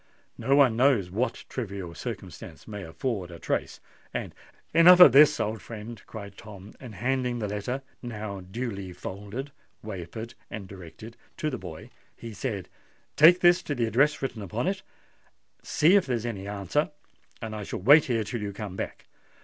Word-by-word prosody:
No 135 - +2
one 135 -5 +5
knows 120 -8 +3
what 115 +5 -2
trivial 100 -8 -5
circumstance 90 - -8
may 105 -2 -6
afford 95 +2 -3
a 85 - -9
trace; - - -2 0.4
and——" - - -3 0.4
"Enough 175 +2 +8
of 180 -7 +11
this, 150 +3 +7
old 110 0 -2
friend," 115 -1 -8
cried 100 -3 -9
Tom; 105 -2 -11
and 120 -5 -10
handing 125 +1 -1
the 110 -3 -2
letter, 105 +7 -3 0.2
now 110 -4 -5
duly 100 -1 -5
folded, 105 +9 -7 0.3
wafered, 110 +3 -7 0.2
and 105 -2 -7
directed, 95 +4 -11 0.2
to 155 - -1
the 125 - -4
boy, 80 -2 -9 0.2
he 115 -2 -9
said, 105 -4 -4 0.5
"Take 175 +4 +7
this 175 +1 +6
to 145 - -3
the 120 -2 +1
address 135 +7 +2
written 125 -5 -3
upon 105 +5 -3
it: 190 0 -1 0.8
see 165 +6 +4
if 200 - +3
there's 120 -3 -1
any 100 -4 -4
answer; 105 - -1 0.5
and 110 -2 -5
I 105 - -5
shall - - -5
wait 145 - +7
here 115 -3 0
till 110 +2 -4
you 100 -1 -4
come 100 -2 -6
back. - - -6
110 Hz, 170 wpm, -27 LUFS, 100-130 Hz, 0.8 s, of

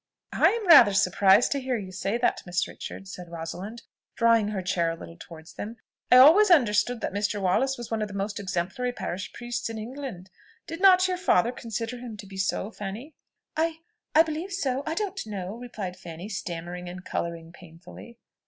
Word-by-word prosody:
"I - - +5
am 460 -2 -3
rather 240 - +8
surprised 190 +3 +4
to 280 - +1
hear 255 -1 -1
you 190 -3 -7
say 195 +4 -2
that, 240 - +1
Miss 175 0 -1
Richards," 195 0 -9
said 180 -1 -9
Rosalind, 175 +7 -7 0.3
drawing 230 -2 +4
her 205 -3 -3
chair 170 -2 0
a 165 - -3
little 165 0 -11
towards 165 -1 -12
them. 225 +3 -7 0.3
"I 250 - +9
always 330 +11 +8
understood 245 - +3
that - - -3
Mr. 205 +1 -1
Wallace 225 +9 +1
was 240 -1 -8
one 225 -1 -1
of 210 - -1
the 200 - -9
most 200 +1 -3
exemplary 190 +6 -2
parish 185 -5 -5
priests 240 0 -4
in 225 - -6
England. 220 -5 -7 0.3
Did 330 +2 -7
not 370 -1 +6
your 365 -1 -1
father 240 - +3
consider 230 0 -5
him 235 -3 -8
to 200 - -9
be 195 0 -11
so, 190 +2 -1
Fanny?" 215 +9 -7 0.4
"I 320 +1 0 0.4
I 320 - +8
believe 325 +4 -5
so, 275 -7 -1
I 320 - -1
don't 390 0 -3
know," 195 -2 -5
replied 220 -7 -6
Fanny, 175 +1 -9
stammering 175 -2 -5
and 180 +1 -9
colouring 165 -1 -4
painfully. 175 +7 -14
210 Hz, 190 wpm, -26 LUFS, 185-250 Hz, 0.4 s, I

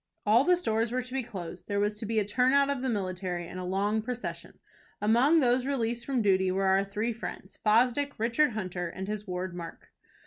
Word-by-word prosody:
All 220 +4 +5
the 360 +3 +4
stores 225 -8 0
were 255 +1 -1
to 255 +1 -10
be 270 - 0
closed, 180 -7 -8
there 200 -1 -1
was 205 +1 +1
to 220 - -4
be 225 0 -1
a 210 - +2
turnout 260 +6 +3
of 275 -3 -2
the 260 - -1
military, 185 -4 -3
and 180 - -7
a - - -4
long 200 +4 0
procession. 245 +2 -6 0.4
Among 250 +10 +4
those 250 0 +3
released 240 -3 -1
from 260 -5 +1
duty 190 -2 +3
were 195 +1 0
our 190 +1 +4
three 210 +4 -2
friends, 210 -3 -8
Fosdick, 250 +6 +2
Richard 235 +5 +2
Hunter, 185 -4 -3
and 190 +3 -6
his 210 0 -4
ward 180 0 -3
Mark. 170 -1 -9
215 Hz, 210 wpm, -29 LUFS, 190-250 Hz, 0.4 s, All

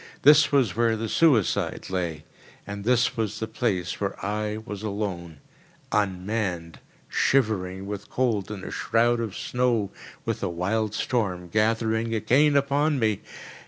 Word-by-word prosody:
This 150 +2 +7
was 130 -10 +2
where 115 -1 +2
the 115 +1 -3
suicide 125 - +2
lay; 85 -5 -2 0.4
and 100 0 -6
this 120 0 +3
was 110 -2 -2
the 110 - -1
place 105 -7 -2
where 100 -1 -1
I 105 +1 -2
was 105 -2 -7
alone—unmanned, 95 0 -4 0.3
shivering 95 -7 +1
with 105 0 -6
cold 115 -7 0
in 105 -3 -6
a - - -6
shroud 120 +1 +2
of 110 -4 -4
snow 120 -5 0 0.3
with - - -2
a - - -1
wild 100 +5 -1
storm 90 -8 -1
gathering 110 +2 +1
again 135 +7 +3
upon 140 +2 +2
me! 110 -4 +1
110 Hz, 135 wpm, -25 LUFS, 95-115 Hz, 0.4 s, This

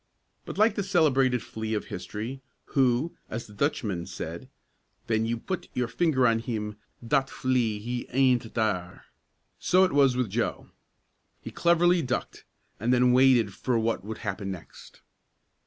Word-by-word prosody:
But, - - -7
like 215 +1 +4
the 205 - -2
celebrated 140 - +2
flea 110 0 -4
of 105 - -3
history, 110 +9 -6 0.3
who, 130 +4 +2
as 115 +2 -5
the 105 - -14
Dutchman 105 - -1
said, 85 -2 -7 0.6
"ven 110 0 +1
you 120 +1 -1
put 185 +10 -5
your 125 -1 0
finger 130 0 +2
on 115 -1 +3
him, 105 -3 -4 0.3
dot 135 0 +2
flea 125 -4 0
he 120 +3 -4
aind't 125 -3 +2
dere!" 90 -6 -1 0.6
so 185 +1 +4
it 185 - +2
was 135 -3 +4
with 125 -6 -1
Joe. 115 +3 -2 0.7
He - - -8
cleverly 175 +1 +3
ducked, 125 -4 -4 0.3
and 115 +5 0
then 125 0 +4
waited 125 -5 +4
for 125 +3 -1
what 115 -2 0
would 110 +2 -6
happen 100 -1 -3
next. 95 -3 -10
120 Hz, 155 wpm, -27 LUFS, 110-135 Hz, 0.7 s, like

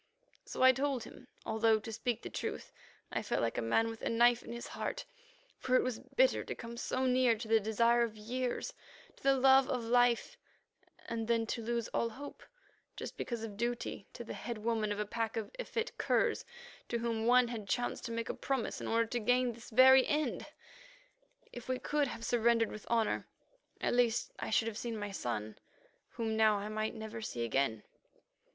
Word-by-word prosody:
So - - -2
I 260 - +9
told 265 -2 -1
him, 250 - -13 0.2
although, 220 0 +3
to 225 - -7
speak 240 +1 -2
the - - -5
truth, - - -4 0.4
I - - -1
felt - - -1
like 115 - 0
a - - -1
man 170 - +2
with 225 0 -6
a - - -1
knife 240 +1 +4
in - - -9
his 235 0 -6
heart, - - -4 0.5
for 255 - +1
it - - +5
was 250 -3 -2
bitter - - +2
to - - -5
come 230 0 -8
so 255 +2 -1
near 250 -2 +4
to 225 +1 -6
the 225 0 +5
desire 230 +3 +3
of 225 -2 -1
years, 250 - -3 0.4
to - - -20
the 275 0 +4
love 265 0 +5
of 250 -3 -1
life, 245 0 +2 0.7
and 225 -1 -3
then 230 -1 +2
to 230 +1 -3
lose 235 0 -2
all 230 - 0
hope 280 +5 -9 0.6
just - - -6
because 235 -2 -4
of 215 -3 -6
duty 235 -3 -3
to 240 - -7
the - - -7
head 235 -2 -5
woman 215 -1 -1
of 205 - -2
a 210 - 0
pack 225 +2 -3
of 220 - -4
effete 485 -1 -3
curs 470 -3 +1 0.4
to 235 - 0
whom 230 -1 -1
one 250 0 +5
had 215 -5 -6
chanced 245 0 -1
to 230 - -4
make 230 0 -3
a - - -2
promise 265 -4 -2
in - - -4
order 230 0 +2
to 240 +2 -2
gain 245 +2 +2
this 235 +1 -12
very 260 +2 +7
end. 300 +1 -1 1.1
If 245 +1 -9
we 255 - +1
could 295 +2 0
have 230 - -6
surrendered 235 -1 +3
with 215 - -9
honour, 230 -2 +1 0.5
at - - 0
least 240 -2 +2
I - - -3
should 225 +1 +2
have 225 -1 -4
seen 230 -2 -4
my 205 -1 -4
son, 110 - -4 0.5
whom 225 -2 -2
now 220 -1 +5
I 205 +1 -4
might 215 +2 -2
never 220 +1 -6
see 120 - -3
again. 115 -3 0
235 Hz, 200 wpm, -33 LUFS, 220-250 Hz, 1.1 s, I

